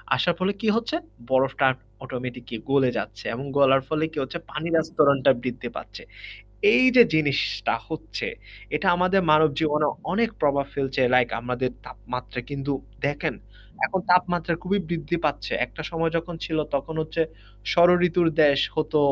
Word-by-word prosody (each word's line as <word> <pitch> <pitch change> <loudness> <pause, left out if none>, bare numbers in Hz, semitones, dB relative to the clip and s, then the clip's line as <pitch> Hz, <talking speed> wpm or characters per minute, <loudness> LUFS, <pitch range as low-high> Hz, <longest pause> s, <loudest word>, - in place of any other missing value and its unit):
আসার 175 -1 +1
ফলে 185 +2 +1
কি 225 - -1
হচ্ছে 230 +7 -1 0.3
বরফটা 135 +1 +2 0.4
অটোমেটিকই 125 -2 -6
গলে 135 -2 +4
যাচ্ছে 105 0 -6
এবং 130 +4 -5
গলার 135 -1 +5
ফলে 155 0 -1
কি - - -11
হচ্ছে, 150 +6 -6
পানির 165 +2 -2
আস্তরণটা 150 -5 +3
বৃদ্ধি 125 -1 -4
পাচ্ছে। - - -8 0.7
এই 255 - +5
যে 240 - +11
জিনিসটা 145 -3 +1
হচ্ছে - - -5 0.5
এটা 195 - -4
আমাদের 185 +2 +3
মানব 155 +1 +6
জীবনে 150 -1 +2 0.3
অনেক 230 0 +2
প্রভাব 140 -2 +2
ফেলছে। 135 -1 -2
লাইক 125 -1 +4
আমাদের 125 +1 -2 0.2
তাপমাত্রা 125 +4 -6
কিন্তু 140 0 -3 0.3
দেখেন 145 0 -2 0.5
এখন 190 - -2
তাপমাত্রা 175 -2 +2
খুবই 200 +2 0
বৃদ্ধি 170 -1 -2
পাচ্ছে। 145 -1 -1
একটা 160 - -9
সময় 165 -1 0
যখন 170 +1 -4
ছিল 160 -1 -2 0.2
তখন 140 +3 -2
হচ্ছে 160 +1 -1 0.5
ষড় 175 +1 +6 0.2
ঋতুর 175 0 +2
দেশ 140 -2 +5 0.2
হতো 155 0 +1
150 Hz, 150 wpm, -24 LUFS, 135-170 Hz, 0.7 s, যে